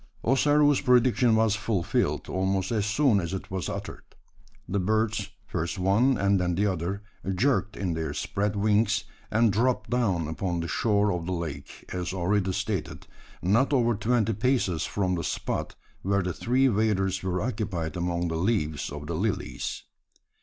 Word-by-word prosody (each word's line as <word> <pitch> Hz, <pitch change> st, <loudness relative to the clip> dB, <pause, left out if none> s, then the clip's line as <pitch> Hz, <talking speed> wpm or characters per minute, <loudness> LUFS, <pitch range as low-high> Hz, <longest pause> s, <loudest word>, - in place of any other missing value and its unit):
Ossaroo's 145 Hz, +3 st, +4 dB
prediction 125 Hz, -1 st, +4 dB
was 110 Hz, -1 st, +3 dB
fulfilled, 105 Hz, -4 st, -1 dB
almost 95 Hz, +2 st, -1 dB
as 105 Hz, -3 st, 0 dB
soon 110 Hz, -1 st, +3 dB
as 85 Hz, +1 st, -3 dB
it 95 Hz, -, -7 dB
was 95 Hz, -4 st, -3 dB
uttered. -, -, -6 dB, 0.7 s
The 100 Hz, -, -1 dB
birds, 110 Hz, +1 st, 0 dB, 0.2 s
first 90 Hz, -1 st, -3 dB
one 105 Hz, +8 st, +3 dB
and 100 Hz, 0 st, +2 dB
then 90 Hz, -1 st, 0 dB
the 100 Hz, +4 st, +1 dB
other, 95 Hz, +1 st, -2 dB, 0.3 s
jerked 120 Hz, -2 st, +1 dB
in 95 Hz, -4 st, -1 dB
their 80 Hz, 0 st, -2 dB
spread 105 Hz, +1 st, -1 dB
wings; 105 Hz, +1 st, +2 dB, 0.3 s
and 110 Hz, -1 st, +3 dB
dropped 125 Hz, +5 st, +1 dB
down 95 Hz, -10 st, +1 dB
upon 85 Hz, +2 st, -2 dB
the 85 Hz, -, -3 dB
shore 105 Hz, +5 st, +2 dB
of 90 Hz, -2 st, -3 dB
the -, -, -2 dB
lake 80 Hz, -5 st, -6 dB
as 90 Hz, -1 st, -3 dB
already 95 Hz, +1 st, +1 dB
stated, 100 Hz, -1 st, -3 dB, 0.4 s
not 115 Hz, +11 st, +3 dB
over 120 Hz, -3 st, +3 dB
twenty 110 Hz, 0 st, +1 dB
paces 105 Hz, -7 st, +1 dB
from 95 Hz, -3 st, 0 dB
the 85 Hz, -2 st, -2 dB
spot -, -, -3 dB, 0.3 s
where 100 Hz, 0 st, +1 dB
the 90 Hz, -1 st, -2 dB
three 130 Hz, +8 st, +2 dB
waders 100 Hz, -4 st, +1 dB
were 90 Hz, -1 st, -1 dB
occupied 95 Hz, -7 st, -3 dB
among 85 Hz, 0 st, -1 dB
the 80 Hz, -1 st, -2 dB
leaves 80 Hz, -5 st, 0 dB
of 75 Hz, +1 st, -6 dB
the 85 Hz, -, -4 dB
lilies. 100 Hz, +4 st, -2 dB
100 Hz, 160 wpm, -27 LUFS, 90-110 Hz, 0.7 s, Ossaroo's